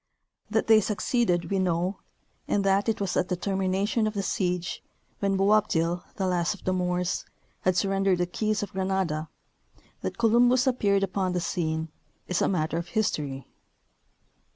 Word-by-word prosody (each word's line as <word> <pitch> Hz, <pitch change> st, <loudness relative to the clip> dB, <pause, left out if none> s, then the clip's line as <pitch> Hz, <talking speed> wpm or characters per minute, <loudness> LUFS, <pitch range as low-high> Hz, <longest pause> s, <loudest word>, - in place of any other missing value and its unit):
That 220 Hz, +1 st, +1 dB
they 220 Hz, -1 st, +6 dB
succeeded 210 Hz, -3 st, 0 dB
we 195 Hz, -, +2 dB
know, 180 Hz, +1 st, 0 dB, 0.5 s
and 200 Hz, -, +1 dB
that 195 Hz, +2 st, +2 dB
it 225 Hz, -, 0 dB
was 195 Hz, -3 st, -1 dB
at -, -, +1 dB
the 180 Hz, -, +1 dB
termination 195 Hz, +4 st, 0 dB
of 215 Hz, -, -4 dB
the 200 Hz, -, -1 dB
siege, 180 Hz, -2 st, -1 dB, 0.4 s
when 195 Hz, -1 st, +1 dB
Boabdil, 180 Hz, -4 st, +2 dB
the 190 Hz, -, -1 dB
last 175 Hz, -1 st, +1 dB
king -, -, -16 dB
of -, -, -21 dB
the 185 Hz, -, +1 dB
Moors, 180 Hz, 0 st, -1 dB, 0.4 s
had 185 Hz, -1 st, +1 dB
surrendered 195 Hz, -1 st, +2 dB
the 175 Hz, -, +1 dB
keys 215 Hz, +3 st, -1 dB
of 200 Hz, -, -6 dB
Granada, 185 Hz, -5 st, -1 dB, 0.7 s
that -, -, -4 dB
Columbus 240 Hz, +2 st, +4 dB
appeared 205 Hz, -6 st, +2 dB
upon 190 Hz, -1 st, -1 dB
the 180 Hz, -, 0 dB
scene, 160 Hz, -2 st, -2 dB, 0.4 s
is 180 Hz, -, 0 dB
a -, -, +3 dB
matter 160 Hz, -3 st, 0 dB
of 170 Hz, -, -6 dB
history. 145 Hz, -, -2 dB
190 Hz, 165 wpm, -27 LUFS, 175-205 Hz, 0.7 s, they